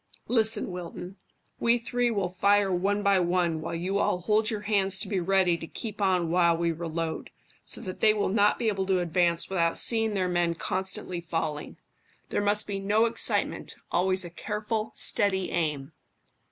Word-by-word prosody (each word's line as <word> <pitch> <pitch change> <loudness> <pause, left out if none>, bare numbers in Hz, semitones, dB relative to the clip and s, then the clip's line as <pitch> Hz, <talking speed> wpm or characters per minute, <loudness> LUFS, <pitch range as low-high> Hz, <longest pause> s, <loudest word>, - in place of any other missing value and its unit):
Listen, 220 -4 +2
Wilton; 180 +1 -8 0.4
we 235 +1 +3
three 245 +1 -1
will 200 -5 -1
fire 200 +2 +2
one 200 +3 0
by 200 -1 +4
one 175 -2 0
while 165 - -4
you 185 +4 -1
all 180 - 0
hold 215 +4 +1
your 215 -3 -3
hands 200 -2 +1
to 195 +1 0
be 195 -1 -1
ready 180 -1 +2
to 165 - -7
keep 215 +2 -7
on 180 -4 +1
while 170 -1 +3
we 170 0 0
reload, 165 0 -4 0.3
so - - -6
that 185 -5 -7
they 215 - +5
will 210 -1 0
not 205 +1 +3
be 235 - -2
able 195 -3 -1
to 190 -1 +2
advance 170 0 +1
without 170 -3 0
seeing 225 -2 +3
their 185 -2 0
men 175 -1 0
constantly 185 0 -3
falling. 165 -3 -4 0.5
There - - -1
must 205 +1 +3
be 200 -1 -4
no 210 +3 +2
excitement, 230 - 0 0.2
always 185 +1 +1
a 175 - -8
careful, 215 +4 -3
steady 190 -3 +1
aim." 150 -5 -2
190 Hz, 180 wpm, -27 LUFS, 175-210 Hz, 0.5 s, they